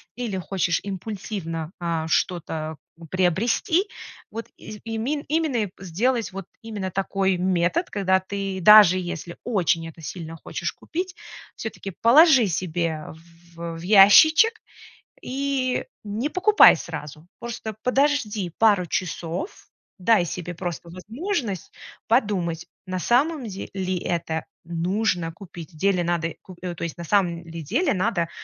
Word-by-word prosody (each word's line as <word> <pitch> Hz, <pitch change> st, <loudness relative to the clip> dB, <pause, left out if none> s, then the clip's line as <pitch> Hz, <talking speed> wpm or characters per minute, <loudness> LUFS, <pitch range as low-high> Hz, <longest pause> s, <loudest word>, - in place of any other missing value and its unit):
или 230 Hz, -6 st, -3 dB
хочешь 180 Hz, -2 st, 0 dB
импульсивно, 190 Hz, -5 st, -5 dB
а, 165 Hz, -2 st, -2 dB
что-то, 160 Hz, -2 st, -1 dB, 0.2 s
э, 165 Hz, -, -10 dB
приобрести, 230 Hz, -, +1 dB, 0.4 s
вот 230 Hz, +1 st, -5 dB
из 215 Hz, -, -9 dB
имен 230 Hz, +6 st, -2 dB
именно, 310 Hz, -4 st, 0 dB
э, 195 Hz, -, -9 dB
сделать 210 Hz, +3 st, -1 dB
вот 195 Hz, -1 st, -7 dB, 0.2 s
именно 210 Hz, -4 st, -5 dB
такой 195 Hz, 0 st, 0 dB
метод, 180 Hz, -, +1 dB
когда 190 Hz, -2 st, +2 dB
ты, 195 Hz, 0 st, -4 dB
даже 205 Hz, -2 st, +8 dB
если 175 Hz, -1 st, -6 dB
очень 170 Hz, -7 st, 0 dB
это 165 Hz, 0 st, -12 dB
сильно 165 Hz, 0 st, -7 dB
хочешь -, -, -4 dB
купить, 360 Hz, +3 st, -5 dB, 0.4 s
всё-таки 210 Hz, -3 st, -6 dB
положи 265 Hz, -, +7 dB
себе 170 Hz, -2 st, -1 dB
в 165 Hz, +1 st, -15 dB, 0.2 s
в, 170 Hz, -, -11 dB, 0.2 s
э, 165 Hz, -, -8 dB
ящичек 315 Hz, -, +7 dB, 0.6 s
и, 265 Hz, -1 st, -1 dB, 0.2 s
не 215 Hz, +7 st, -2 dB
покупай 390 Hz, +5 st, +7 dB
сразу. 150 Hz, +2 st, -8 dB
Просто 235 Hz, -2 st, -6 dB
подожди 250 Hz, -, +1 dB
пару 205 Hz, -5 st, +4 dB
часов, 175 Hz, -, -4 dB, 0.3 s
дай 195 Hz, -1 st, +4 dB
себе 175 Hz, +1 st, -5 dB
просто 175 Hz, -1 st, -5 dB
возможность 220 Hz, -, -4 dB, 0.4 s
подумать, 195 Hz, -8 st, +1 dB, 0.2 s
на 185 Hz, 0 st, -3 dB
самом 270 Hz, -, +2 dB
де 195 Hz, -1 st, -7 dB
ли 185 Hz, -1 st, -1 dB
это 165 Hz, -2 st, -2 dB, 0.2 s
нужно 175 Hz, +1 st, -1 dB
купить, 175 Hz, -2 st, -11 dB
в -, -, -15 dB
деле 190 Hz, +1 st, +2 dB
надо 170 Hz, -1 st, -1 dB
ку 185 Hz, -, -13 dB
то 175 Hz, -2 st, -6 dB
есть, 170 Hz, -, -4 dB
на 170 Hz, -, -6 dB
самом 170 Hz, -2 st, +1 dB
ли 165 Hz, 0 st, -7 dB
деле 285 Hz, -, +1 dB
надо 185 Hz, -3 st, 0 dB
190 Hz, 135 wpm, -24 LUFS, 170-230 Hz, 0.6 s, даже